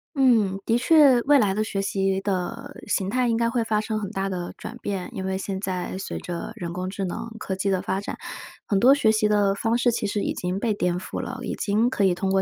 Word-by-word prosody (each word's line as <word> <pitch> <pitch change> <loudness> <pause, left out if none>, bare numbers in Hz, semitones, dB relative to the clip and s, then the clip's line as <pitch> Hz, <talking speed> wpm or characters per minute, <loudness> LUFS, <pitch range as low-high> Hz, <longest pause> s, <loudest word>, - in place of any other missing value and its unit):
嗯， 225 -8 +3
的 230 - +3
确 275 -2 +6
未 285 +3 +5
来 205 -7 +3
的 215 +2 0
学 200 -2 -2
习 195 -1 0
的 190 -3 -3
形 195 -2 0
态 250 +3 +1
应 230 -1 +1
该 230 0 +2
会 235 -1 0
发 215 -1 +1
生 215 0 -2
很 200 -3 -4
大 195 -2 -2
的 180 -2 -4
转 235 - -7
变。 195 -3 -3
因 190 - -4
为 190 0 -1
现 195 0 -4
在 185 -1 -3
随 195 - -5
着 175 -1 -5
人 170 -1 -5
工 180 +1 -3
智 195 0 -3
能、 225 +6 -5
科 190 - -3
技 190 +1 -1
的 190 -2 +1
发 190 +1 -2
展， - - -6 0.5
很 200 - +1
多 260 +6 +7
学 220 -6 +3
习 215 -1 +2
的 205 -2 +3
方 225 +3 0
式 245 0 +3
其 220 -2 -1
实 205 0 -1
已 - - -1
经 180 +2 -3
被 220 0 +1
颠 180 -3 0
覆 180 - -5
了， 255 +2 -6
已 - - -3
经 215 +4 +1
可 210 - 0
以 185 -2 +3
通 190 +2 -1
过 190 0 +3
200 Hz, 275 characters per minute, -24 LUFS, 190-230 Hz, 0.5 s, 多